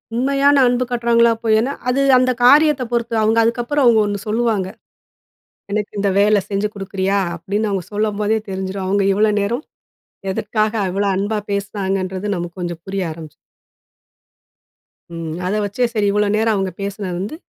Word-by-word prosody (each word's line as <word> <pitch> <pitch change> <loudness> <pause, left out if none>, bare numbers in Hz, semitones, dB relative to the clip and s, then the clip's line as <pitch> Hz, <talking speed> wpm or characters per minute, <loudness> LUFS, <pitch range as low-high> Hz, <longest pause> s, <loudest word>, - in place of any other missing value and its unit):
உண்மையான 275 +3 +3
அன்பு 245 +1 +1
காட்டுறாங்களா? 235 -1 +3
பொய் 220 -1 +3
ஏன்னா, 255 +5 -1 0.2
அது 260 +2 +1 0.2
அந்த 255 0 +3
காரியத்த 295 0 +5
பொறுத்து. 235 -1 -1
அவுங்க 220 +1 +3
அதுக்கப்புறம் 240 +1 +2
ஒண்ணு 205 -1 -2
சொல்லுவாங்க. 215 -3 0 1.0
எனக்கு 210 0 -2
இந்த 200 0 +1
வேல 210 +1 +4
செஞ்சு 200 +1 0
குடுக்குறியா 195 0 -1 0.2
அப்டின்னு, 205 +6 -2
அவங்க 190 -2 -2
சொல்லம்போதே 210 +1 0
தெரிஞ்சிரும். 190 0 -4
அவுங்க 200 +1 +1
இவ்வளோ 210 +2 +3
நேரம் 235 +8 -2 0.7
எதற்காக 215 +2 -1 0.2
அவ்ளோ 200 +2 0
அன்பா 205 +3 -1
பேசினாங்கன்றது, 195 -1 -2
நமக்கு 175 +1 -6
கொஞ்சம் 175 -1 -5
புரிய 195 0 -2
ஆரம்பிச்சுரும். 155 -2 -11 1.8
ம். 165 - -5 0.2
அத 190 - -1
வச்சே 205 +5 0
சரி 215 -3 +1
இவ்வளோ 210 0 +1
நேரம் 225 0 +2
அவுங்க 195 -1 -1
பேசினது 195 -2 -4
வந்து 205 +10 -4
210 Hz, 145 wpm, -19 LUFS, 195-235 Hz, 1.8 s, காரியத்த